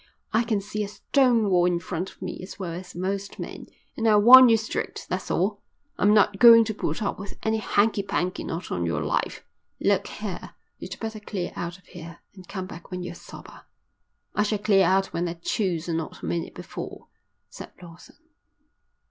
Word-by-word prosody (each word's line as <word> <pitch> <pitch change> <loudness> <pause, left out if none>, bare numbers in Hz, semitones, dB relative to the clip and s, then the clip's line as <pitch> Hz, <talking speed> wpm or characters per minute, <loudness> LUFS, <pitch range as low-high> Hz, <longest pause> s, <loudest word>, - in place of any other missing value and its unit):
I 220 - +4
can 220 -4 0
see 210 +1 -4
a - - -4
stone 240 +1 +2
wall 180 -1 +4
in 175 -1 +1
front 175 +2 -4
of - - -13
me 185 - -5
as 185 - -9
well 180 -4 -5
as 180 0 -9
most 195 +2 -3
men, - - -7 0.3
and 225 - 0
I 215 - +6
warn 250 +4 +9
you 225 - +5
straight, 220 0 -4
that's - - -4
all. - - 0 0.4
I'm 205 - +4
not 205 -1 +4
going 230 -1 +9
to 220 - -3
put 215 - -3
up 195 - -2
with 200 - -8
any 220 0 +1
hanky 210 0 +2
panky, 195 -2 -2
not 165 +2 -5
on 85 - -1
your 85 - -1
life." - - -2 0.3
"Look - - +1
here, - - -7 0.2
you'd - - -8
better 220 -1 -5
clear 200 -4 -5
out 175 +1 -5
of 195 - -26
here, 170 -1 -11 0.2
and 185 -3 -14
come 190 -2 -5
back 170 -2 -11
when 180 -1 -5
you're 180 - -6
sober." - - -13 0.7
"I - - +1
shall 210 0 +1
clear 200 -2 +3
out 190 +1 +1
when 175 +1 -1
I 170 - -5
choose 170 -1 -2
and 165 -1 0
not 160 - -8
a - - -3
minute 85 +1 -3
before," - - -8 0.5
said - - -10
Lawson. 170 -1 -14
195 Hz, 200 wpm, -25 LUFS, 175-215 Hz, 0.7 s, warn